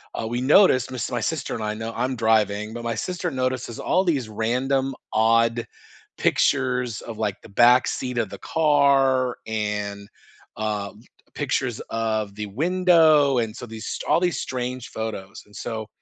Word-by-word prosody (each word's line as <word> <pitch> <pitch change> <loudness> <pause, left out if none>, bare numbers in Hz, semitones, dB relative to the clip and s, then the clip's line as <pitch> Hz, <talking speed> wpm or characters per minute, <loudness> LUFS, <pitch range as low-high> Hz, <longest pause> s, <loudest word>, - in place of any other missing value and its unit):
uh, 110 - -3
we 120 +2 -2
noticed 130 - +5
my 130 - -5
sis 115 - -3
my 120 - -1
sister 145 +4 -2
and 110 - -4
I 105 0 -1
no 110 +1 -5
I'm 125 +2 -1
driving, 110 -1 +1
but 120 - -6
my 115 -1 -2
sister 175 +5 -3
notices 130 -2 -2
all 185 +1 +2
these 140 -9 0
random, 130 +5 0 0.2
odd 115 +1 +3 0.5
pictures 125 -4 +1
of, 115 -2 -8
like, 105 -3 -1
the - - -13
back 120 +5 +5
seat 125 -1 -3
of 110 -4 -1
the - - -8
car, 140 -5 +3
and, 105 -2 -3 0.5
um, 105 -1 -3 0.3
pictures 130 -4 -1
of 110 -3 -2
the 105 0 -4
window, 155 - +4
and 110 -2 -2
so - - -7
these 110 0 -8
st - - -4
all - - +4
these 175 -1 0
strange 125 -1 -4
photos, 110 -4 -6
and 105 - -23
so, 110 -2 -5
120 Hz, 170 wpm, -23 LUFS, 110-135 Hz, 0.5 s, noticed